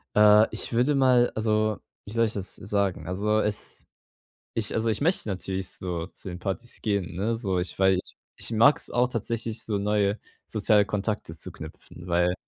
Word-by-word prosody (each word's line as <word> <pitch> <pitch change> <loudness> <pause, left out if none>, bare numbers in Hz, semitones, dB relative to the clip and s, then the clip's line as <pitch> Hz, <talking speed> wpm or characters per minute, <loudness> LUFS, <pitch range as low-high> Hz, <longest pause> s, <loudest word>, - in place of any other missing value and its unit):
Äh, 105 +1 +7
ich 110 - -1
würde 125 +5 +3
mal 125 -3 +4
alseo, 110 -1 +1 0.3
wie 105 - -9
soll 115 +1 +2
ich 110 - -2
das 100 -2 -4
sagen? 95 -4 -1
Also 105 +4 +1
es 105 -1 -1 0.7
ich 110 -2 0
also, 110 +1 0
ich 110 -1 0
möchte 170 -4 +1
natürlich 95 -1 -3
so 85 -2 -4
zu 95 - -10
den 90 0 -7
Partys 100 +6 -5
gehen, 100 -5 -1
ne, 110 +5 0
so 95 -6 -1
ich 90 - -4
weil 95 0 +4
ich - - -7 0.2
ich - - -2
mag 115 +6 +5
es - - -5
auch 125 +1 +2
tatsächlich 115 -1 -3
so 105 -2 -1
neue 105 0 +1 0.3
soziale 105 -1 +3
Kontakte 105 -4 -3
zu - - -7
knüpfen, 90 - -11
weil, 90 0 +2
105 Hz, 190 wpm, -26 LUFS, 95-115 Hz, 0.7 s, Äh